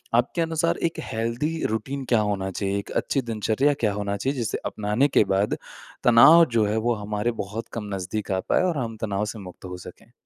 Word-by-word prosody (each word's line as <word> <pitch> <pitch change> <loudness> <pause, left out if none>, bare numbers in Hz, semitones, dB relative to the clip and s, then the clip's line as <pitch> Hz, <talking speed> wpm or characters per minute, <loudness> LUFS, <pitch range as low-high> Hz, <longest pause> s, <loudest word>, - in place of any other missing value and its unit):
आपके 125 +8 +1
अनुसार 165 0 0
एक 165 - -7
हेल्दी 120 +9 -2
रूटीन 135 +6 -3
क्या 120 - +4
होना 100 -2 -1
चाहिए, 100 +1 -2
एक - - -9
अच्छी 135 - 0
दिनचर्या 115 +4 +1
क्या 105 -2 +2
होना 100 0 -2
चाहिए? 135 +5 -2
जिसे 115 -3 -1
अपनाने 105 +6 +1
के 135 - +4
बाद 100 +2 +1 0.5
तनाव 135 +8 +8
जो 110 - +4
है 105 +1 0
वो 120 +2 +1
हमारे 105 +2 -2
बहुत 105 +4 -6
कम 105 -3 -5
नज़दीक 95 +2 -4
आ 95 - +1
पाए - - +3
और 175 -4 0
हम 115 -4 -3
तनाव 105 -2 -1
से 105 +1 -6
मुक्त 95 -1 -11
हो 90 0 -6
सके? 90 - -13
110 Hz, 205 wpm, -24 LUFS, 105-130 Hz, 0.5 s, तनाव